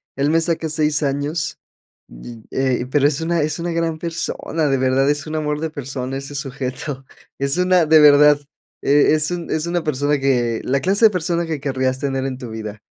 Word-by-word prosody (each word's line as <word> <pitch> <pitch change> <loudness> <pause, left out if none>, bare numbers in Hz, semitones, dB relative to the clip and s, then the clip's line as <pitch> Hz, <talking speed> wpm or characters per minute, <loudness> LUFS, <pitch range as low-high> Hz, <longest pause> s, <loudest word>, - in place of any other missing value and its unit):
él 140 +2 0
me 165 +1 +3
saca 165 -1 -1
6 150 -1 +1
años, 145 +3 -2 0.5
y, 110 - -11
eh, 130 -2 0
pero 140 +1 +2
es 145 0 -1
una, 165 0 0
es 155 +2 -2
una 170 +1 -3
gran 165 -1 -1
persona, 165 -1 -3
de 135 -1 +1
verdad 130 +1 +2
es 145 +1 -1
un 155 - -4
amor 150 -1 -2
de 160 +1 -2
persona, 135 -3 -5
ese 135 +1 -7
sujeto 135 0 -5 0.3
es 140 +3 -1
una 180 -2 +3
de 155 0 +6
verdad, 150 0 +7 0.4
e 145 +2 +4
es 155 +1 +2
un, 175 -1 -4
es 155 0 -1
una 175 -1 -1
persona 145 0 0
que 120 -4 0
la 135 +2 0
clase 195 +8 +3
de 215 - +6
persona 170 -1 -1
que 160 -3 -3
querrías 130 -1 -1
tener 135 -1 -2
en 130 -1 -4
tu 125 -3 -8
vida, 110 -1 -7
145 Hz, 205 wpm, -20 LUFS, 135-160 Hz, 0.5 s, verdad